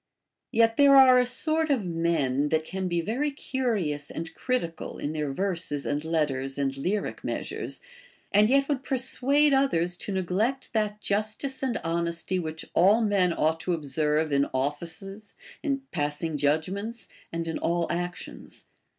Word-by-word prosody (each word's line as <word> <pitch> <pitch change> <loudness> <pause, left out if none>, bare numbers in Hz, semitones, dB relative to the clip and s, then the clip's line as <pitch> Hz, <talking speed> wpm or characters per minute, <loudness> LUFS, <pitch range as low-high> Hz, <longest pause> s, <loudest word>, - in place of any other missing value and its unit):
Yet 225 0 +3
there 280 -1 +7
are 260 -2 +8
a 250 - +2
sort 315 +5 0
of 255 -9 +1
men 160 -5 0
that 160 0 +1
can 190 +2 -3
be 175 -1 0
very 245 - -1
curious 220 - -2
and 165 0 -6
critical 170 -11 -3
in 145 - -3
their 150 -2 -2
verses 170 -4 -2
and 145 +1 -1
letters 145 -5 -1
and 135 -1 -1
lyric 185 +10 -2
measures, - - -4 0.5
and 210 +2 +5
yet 275 +1 +3
would 280 -3 -1
persuade 275 +3 +2
others 180 -11 +2
to 200 - -5
neglect 195 +10 -1
that 210 -1 -1
justice 215 +6 -2
and 260 -3 0
hon 170 0 0
esty 170 +2 -1
which 160 -1 -5
all 200 +7 +5
men 200 -5 +2
ought 160 0 +1
to 180 +2 -1
observe 150 0 0
in 140 0 +2
offices, 170 +9 -3 0.3
in 275 -3 -1
passing 150 +1 -2
judgments, 185 - -1 0.2
and 165 0 -3
in 160 - -3
all 170 0 0
actions. 175 +1 -6
180 Hz, 155 wpm, -27 LUFS, 160-230 Hz, 0.5 s, are